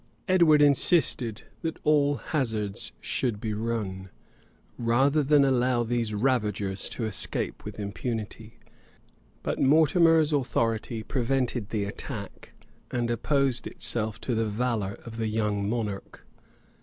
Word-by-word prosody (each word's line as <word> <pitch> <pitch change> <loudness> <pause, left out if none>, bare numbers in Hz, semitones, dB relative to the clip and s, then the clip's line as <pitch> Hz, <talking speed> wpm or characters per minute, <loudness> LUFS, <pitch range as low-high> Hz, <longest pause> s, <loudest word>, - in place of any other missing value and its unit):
Edward 170 -6 +5
insisted 140 - +3 0.2
that 165 -2 -3
all 145 -1 +3
hazards 110 - -2
should 115 -5 -1
be 110 0 -3
run, 105 -4 -3 0.7
rather 135 +6 +2
than 145 0 +4
allow 125 -2 +2
these 115 -1 -1
ravagers 105 -4 -1
to 115 - -3
escape 110 -3 -2
with 105 0 -8
impunity; 110 +1 -5 0.9
but - - -2
Mortimer's 160 +2 +4
authority 115 -4 -1
prevented 125 -2 -1
the 105 -2 -1
attack, 100 - -7 0.4
and 120 -2 -1
opposed 135 +1 +1
itself 110 -2 -2
to 125 - -1
the 110 -1 0
valor 105 -2 -2
of 115 -1 -8
the 110 -1 -1
young 105 -2 -1
monarch. 105 -4 -4
115 Hz, 120 wpm, -27 LUFS, 105-135 Hz, 0.9 s, Edward